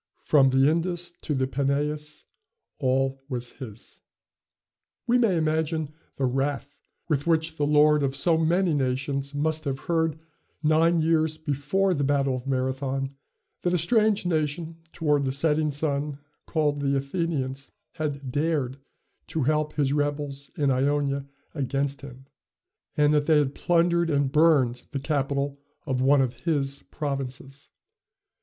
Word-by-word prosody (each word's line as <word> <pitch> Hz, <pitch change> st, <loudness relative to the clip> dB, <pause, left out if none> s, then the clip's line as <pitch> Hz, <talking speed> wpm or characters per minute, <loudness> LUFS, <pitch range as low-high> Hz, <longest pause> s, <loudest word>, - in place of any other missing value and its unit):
From 135 Hz, -3 st, +5 dB
the 135 Hz, +1 st, +4 dB
Indus 175 Hz, +2 st, -1 dB
to 150 Hz, -, -2 dB
the 130 Hz, 0 st, +1 dB
Peneus, 145 Hz, +3 st, -2 dB, 0.5 s
all 135 Hz, 0 st, 0 dB
was 120 Hz, -2 st, -3 dB
his. 120 Hz, -4 st, -11 dB, 1.0 s
We 245 Hz, 0 st, +3 dB
may 215 Hz, -7 st, +3 dB
imagine 160 Hz, -1 st, -1 dB, 0.2 s
the 135 Hz, -, 0 dB
wrath 135 Hz, +2 st, -2 dB, 0.3 s
with 150 Hz, -2 st, -1 dB
which 160 Hz, -1 st, +1 dB
the 145 Hz, -, +1 dB
lord 150 Hz, 0 st, +5 dB
of 135 Hz, -1 st, 0 dB
so 170 Hz, +2 st, +4 dB
many 170 Hz, +2 st, +2 dB
nations 135 Hz, +1 st, -1 dB
must 155 Hz, +2 st, 0 dB
have 135 Hz, -1 st, -2 dB
heard, 160 Hz, -3 st, 0 dB, 0.5 s
nine 160 Hz, +2 st, +4 dB
years 160 Hz, -1 st, +2 dB
before 155 Hz, +6 st, 0 dB
the 145 Hz, -4 st, -1 dB
battle 140 Hz, -1 st, +1 dB
of 130 Hz, +1 st, -7 dB
Marathon, 135 Hz, +1 st, -1 dB, 0.5 s
that 180 Hz, 0 st, +1 dB
a -, -, +3 dB
strange 215 Hz, +3 st, +2 dB
nation 160 Hz, 0 st, -1 dB
toward 150 Hz, -3 st, +1 dB
the 135 Hz, -, 0 dB
setting 150 Hz, +2 st, +2 dB
sun, 145 Hz, -1 st, -2 dB, 0.3 s
called 150 Hz, -3 st, 0 dB
the 140 Hz, 0 st, +1 dB
Athenians, 140 Hz, -2 st, -2 dB, 0.3 s
had 140 Hz, -4 st, -3 dB
dared 145 Hz, -3 st, 0 dB, 0.5 s
to 160 Hz, -, -2 dB
help 150 Hz, +2 st, +1 dB
his 140 Hz, -2 st, +1 dB
rebels 145 Hz, -1 st, -2 dB
in 145 Hz, -2 st, +2 dB
Ionia 140 Hz, +1 st, 0 dB, 0.3 s
against 140 Hz, -1 st, -2 dB
him, 135 Hz, -1 st, -11 dB, 0.7 s
and 150 Hz, 0 st, +4 dB
that 150 Hz, -1 st, +2 dB
they 160 Hz, -2 st, +5 dB
had 145 Hz, -2 st, +1 dB
plundered 170 Hz, 0 st, +2 dB
and 140 Hz, -3 st, +1 dB
burned 140 Hz, -6 st, +3 dB
the 140 Hz, -, -1 dB
capital 140 Hz, -1 st, -1 dB, 0.3 s
of 130 Hz, -3 st, -1 dB
one 135 Hz, +1 st, +5 dB
of 125 Hz, -2 st, 0 dB
his 140 Hz, -4 st, -2 dB
provinces. 135 Hz, -1 st, -5 dB
145 Hz, 140 wpm, -26 LUFS, 135-160 Hz, 1.0 s, From